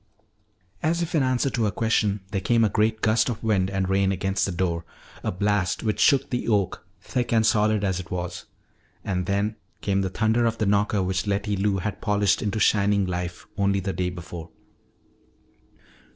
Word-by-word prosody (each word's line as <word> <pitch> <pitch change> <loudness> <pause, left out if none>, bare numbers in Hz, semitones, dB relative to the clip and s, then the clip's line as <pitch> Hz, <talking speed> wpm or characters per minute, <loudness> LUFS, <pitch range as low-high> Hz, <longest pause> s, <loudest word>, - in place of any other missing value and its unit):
As 170 +2 +1
if 170 - -5
in 155 - +3
answer 130 +1 +1
to 115 -2 0
her - - +2
question, 105 -1 0
there 95 - -1
came 115 +3 +3
a - - +2
great 110 +1 +1
gust 110 +1 +3
of 120 -2 -4
wind 100 -4 +2
and 95 -1 -1
rain 95 0 +2
against 95 +1 0
the - - -2
door, 85 -2 -1 0.4
a - - -1
blast 100 0 0
which 110 -2 -1
shook 140 -3 +4
the 125 - -2
oak, 100 -7 0 0.2
thick 125 -2 -2
and 110 -1 +3
solid 110 -1 +2
as 95 -2 0
it 90 -1 -8
was. 90 -1 -4 0.6
And 90 -1 -1
then 100 +2 0 0.2
came 100 -1 +1
the 95 - -1
thunder 110 +4 +2
of 115 0 -1
the 110 - 0
knocker 100 0 +2
which 95 +2 -1
Letty 100 +1 0
Lou 100 0 +1
had 95 +2 -4
polished 105 -2 +2
into 105 +1 -1
shining 100 -1 +3
life 90 -1 -4
only 100 0 +2
the 95 0 -3
day 90 -1 -1
before. 85 -2 -8
100 Hz, 190 wpm, -25 LUFS, 95-110 Hz, 0.6 s, shook